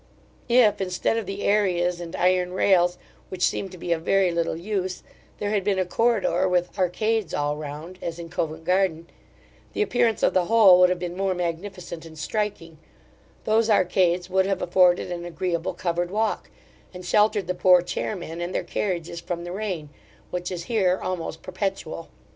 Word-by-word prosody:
If, 220 Hz, -4 st, +4 dB
instead 185 Hz, +4 st, 0 dB
of 225 Hz, -4 st, -3 dB
the 195 Hz, +1 st, -5 dB
areas 180 Hz, -4 st, +1 dB
and 170 Hz, -1 st, -7 dB
iron 180 Hz, 0 st, +2 dB
rails, 180 Hz, -2 st, +3 dB, 0.3 s
which 185 Hz, -1 st, 0 dB
seem 195 Hz, -, -1 dB
to 185 Hz, -, -11 dB
be 175 Hz, -, -5 dB
of 165 Hz, -1 st, +1 dB
very 190 Hz, +1 st, +2 dB
little 170 Hz, -1 st, -1 dB
use, 185 Hz, 0 st, -3 dB, 0.3 s
there 205 Hz, 0 st, -2 dB
had 205 Hz, -2 st, +1 dB
been 200 Hz, -1 st, +1 dB
a 185 Hz, -, +1 dB
corridore 190 Hz, -3 st, +1 dB
with 180 Hz, -1 st, 0 dB
arcades 215 Hz, +3 st, 0 dB
all 145 Hz, 0 st, 0 dB
round, 155 Hz, +5 st, -8 dB
as 170 Hz, -1 st, -4 dB
in 170 Hz, -1 st, -7 dB
Covent 160 Hz, -1 st, -3 dB
garden, 180 Hz, -2 st, +1 dB, 0.7 s
the -, -, +1 dB
appearance 235 Hz, -, +1 dB
of -, -, +3 dB
the 185 Hz, -1 st, +2 dB
whole 200 Hz, -4 st, +7 dB
would 180 Hz, 0 st, +6 dB
have 180 Hz, -, 0 dB
been 175 Hz, 0 st, -5 dB
more 190 Hz, 0 st, 0 dB
magnificent 175 Hz, 0 st, -5 dB
and 160 Hz, -1 st, -12 dB
striking; 170 Hz, -2 st, -3 dB, 0.6 s
those 220 Hz, +1 st, +2 dB
arcades 180 Hz, -3 st, +2 dB
would 190 Hz, 0 st, +2 dB
have 195 Hz, -2 st, -1 dB
afforded 180 Hz, 0 st, +3 dB
an 175 Hz, -1 st, -4 dB
agreeable 175 Hz, -1 st, -3 dB
covered 175 Hz, 0 st, -1 dB
walk, 215 Hz, +3 st, -1 dB, 0.5 s
and 180 Hz, 0 st, -8 dB
sheltered 210 Hz, +1 st, +3 dB
the 180 Hz, -, -1 dB
poor 180 Hz, 0 st, +5 dB
chairmen 175 Hz, -3 st, -4 dB
and 175 Hz, +2 st, -4 dB
their -, -, 0 dB
carriages 170 Hz, -3 st, -3 dB
from 170 Hz, 0 st, -4 dB
the 175 Hz, -, -6 dB
rain, 185 Hz, -6 st, -4 dB, 0.4 s
which 180 Hz, 0 st, -3 dB
is 175 Hz, -2 st, -4 dB
here 190 Hz, -3 st, +1 dB
almost 165 Hz, -3 st, -4 dB
perpetual. 185 Hz, -3 st, -4 dB
180 Hz, 175 wpm, -24 LUFS, 170-195 Hz, 0.7 s, whole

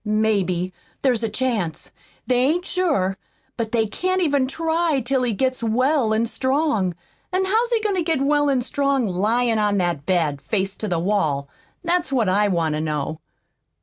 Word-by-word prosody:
"Maybe. 200 Hz, -4 st, 0 dB, 0.3 s
There's 250 Hz, -4 st, +2 dB
a 225 Hz, -, -1 dB
chance. 215 Hz, -8 st, -2 dB, 0.3 s
They 250 Hz, -, +2 dB
ain't 315 Hz, +8 st, +1 dB
sure. 290 Hz, -, 0 dB, 0.4 s
But 225 Hz, -2 st, -3 dB
they 225 Hz, -2 st, +2 dB
can't 370 Hz, -, -1 dB
even 285 Hz, -6 st, +2 dB
TRY 320 Hz, +1 st, 0 dB
till 260 Hz, +2 st, 0 dB
he 245 Hz, -2 st, +1 dB
gets 255 Hz, +4 st, -1 dB
well 250 Hz, +2 st, +2 dB
an' 220 Hz, +1 st, +2 dB
strong. 260 Hz, -, 0 dB, 0.4 s
An' 375 Hz, +1 st, +1 dB
how's 450 Hz, +5 st, +1 dB
he 460 Hz, -2 st, +2 dB
goin' 425 Hz, -2 st, 0 dB
to 370 Hz, -, 0 dB
get 320 Hz, -3 st, 0 dB
well 290 Hz, +1 st, +2 dB
an' 260 Hz, -3 st, +1 dB
strong 275 Hz, -1 st, 0 dB
lyin' 220 Hz, +5 st, +1 dB
on 205 Hz, -1 st, +2 dB
that 175 Hz, -6 st, -1 dB
bed, 160 Hz, -6 st, +1 dB
face 195 Hz, +6 st, -1 dB
to 215 Hz, -, -3 dB
the 175 Hz, -3 st, 0 dB
wall? 165 Hz, -7 st, 0 dB, 0.4 s
That's 340 Hz, -4 st, 0 dB
what 240 Hz, -6 st, +2 dB
I 205 Hz, +3 st, +3 dB
want 165 Hz, -5 st, 0 dB
to 150 Hz, -, -1 dB
know!" 155 Hz, 0 st, -3 dB
230 Hz, 180 wpm, -22 LUFS, 190-285 Hz, 0.4 s, I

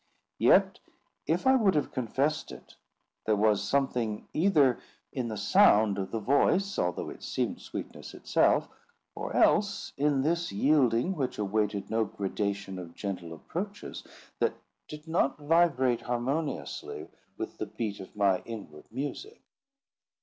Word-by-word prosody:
Yet, -, -, +4 dB, 0.5 s
if -, -, 0 dB
I 265 Hz, 0 st, +6 dB
would 210 Hz, -8 st, +3 dB
have 150 Hz, -, 0 dB
confessed 140 Hz, +5 st, -1 dB
it, -, -, -12 dB, 0.5 s
there 110 Hz, -, +4 dB
was 105 Hz, -1 st, +3 dB
something 120 Hz, -6 st, -1 dB
either 150 Hz, -8 st, +3 dB, 0.3 s
in 125 Hz, -3 st, -2 dB
the 110 Hz, -2 st, -4 dB
sound 105 Hz, 0 st, +4 dB
of 95 Hz, -1 st, -3 dB
the 115 Hz, -, -3 dB
voice, 160 Hz, -, +2 dB
although 90 Hz, 0 st, -1 dB
it -, -, -12 dB
seemed -, -, -2 dB
sweetness -, -, -8 dB
itself, -, -, +2 dB, 0.5 s
or -, -, -5 dB
else 200 Hz, -1 st, +2 dB
in 140 Hz, -2 st, +2 dB
this 170 Hz, +3 st, 0 dB
yielding 130 Hz, -, +3 dB
which 135 Hz, -5 st, -2 dB
awaited 105 Hz, -1 st, -1 dB
no 110 Hz, 0 st, +2 dB
gradation 100 Hz, -1 st, -3 dB
of 85 Hz, -2 st, -9 dB
gentle 90 Hz, -5 st, -5 dB
approaches, 195 Hz, -, -6 dB, 0.4 s
that -, -, +1 dB, 0.3 s
did 150 Hz, +1 st, -10 dB
not 160 Hz, -4 st, +1 dB
vibrate 145 Hz, -5 st, +2 dB
harmoniously 135 Hz, +6 st, -3 dB, 0.3 s
with -, -, -6 dB
the 110 Hz, -, -3 dB
beat 105 Hz, 0 st, -4 dB
of 95 Hz, -, -11 dB
my 100 Hz, -3 st, +3 dB
inward 105 Hz, -10 st, -9 dB
music. 145 Hz, -, -5 dB
120 Hz, 135 wpm, -29 LUFS, 105-155 Hz, 0.5 s, I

